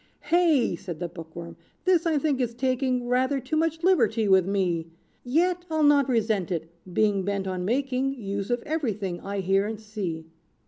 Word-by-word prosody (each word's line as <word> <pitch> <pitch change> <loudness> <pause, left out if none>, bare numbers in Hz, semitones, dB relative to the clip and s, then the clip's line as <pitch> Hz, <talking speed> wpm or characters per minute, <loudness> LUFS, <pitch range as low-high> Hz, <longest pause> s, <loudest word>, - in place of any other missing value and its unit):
"Hey!" 310 - +3
said 170 -1 -7
the 175 - -2
bookworm, 165 0 -9 0.3
"this 355 -2 +3
I 320 -2 +2
think 280 -2 0
is 235 -2 -2
taking 255 -1 0
Rather 260 +3 +1
too 265 +4 -3
much 325 +1 0
liberty 230 - +3
with 190 -2 +4
me! 180 -5 0 0.4
Yet 345 +7 +1
I'll 315 -1 +1
not 285 -2 +5
resent 220 -6 +1
it; 165 -2 -3 0.2
being 205 +1 +2
bent 200 0 -2
on 185 -1 -3
making 265 +3 0
Use 200 -4 -4
of 245 0 -1
every 300 -7 -1
thing 190 -4 -4
I 200 0 -4
hear 195 +2 +2
and 220 -1 -5
see. 200 -7 -5
225 Hz, 180 wpm, -26 LUFS, 190-280 Hz, 0.4 s, not